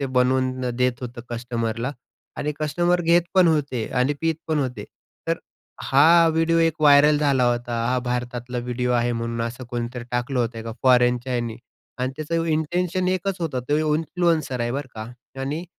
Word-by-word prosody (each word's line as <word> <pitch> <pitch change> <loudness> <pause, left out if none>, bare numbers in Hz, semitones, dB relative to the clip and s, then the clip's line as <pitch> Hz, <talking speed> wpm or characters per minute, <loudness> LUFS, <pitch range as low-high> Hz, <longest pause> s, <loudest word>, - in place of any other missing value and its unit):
ते 140 - -1
बनवून 130 0 +1 0.2
देत 125 -1 0
होतं 120 0 -6
कस्टमरला 120 +1 -3 0.4
आणि 150 +1 -2
कस्टमर 175 +4 +1
घेत 170 +1 +4
पण 185 -3 +6
होते 140 -7 0
आणि 135 +4 +2
पीत 165 0 +1
पण 155 -1 +1
होते. 130 -3 -3 0.4
तर - - +1 0.4
हा 165 +5 +5
व्हिडिओ 165 +1 +2
एक 165 -1 +3
व्हायरल 145 0 +6
झाला 140 -4 +2
होता. 120 -1 -3
हा 125 +1 +1
भारतातला 125 0 -3
व्हिडिओ 125 +1 -2
आहे 120 0 +1
म्हणून 115 0 -3
असं 125 +2 -7
कोणीतरी 120 0 -4
टाकलं 125 +2 -1
होतं 115 -1 -3
का 115 0 -6
फॉरेनच्या 125 0 +3
ह्याने 120 -2 -2 0.4
आणि 130 +1 -1
त्याचं 165 +2 -1
इंटेंशन 175 +4 0
एकच 185 +1 -1
होतं, 145 -6 -2
तो 145 - +3 0.2
इन्फ्लुएन्सर 160 -4 0
आहे 120 - -1
बरं 140 0 -4
का 110 +2 -7 0.3
आणि 150 +6 -3
130 Hz, 165 wpm, -23 LUFS, 120-155 Hz, 0.4 s, पण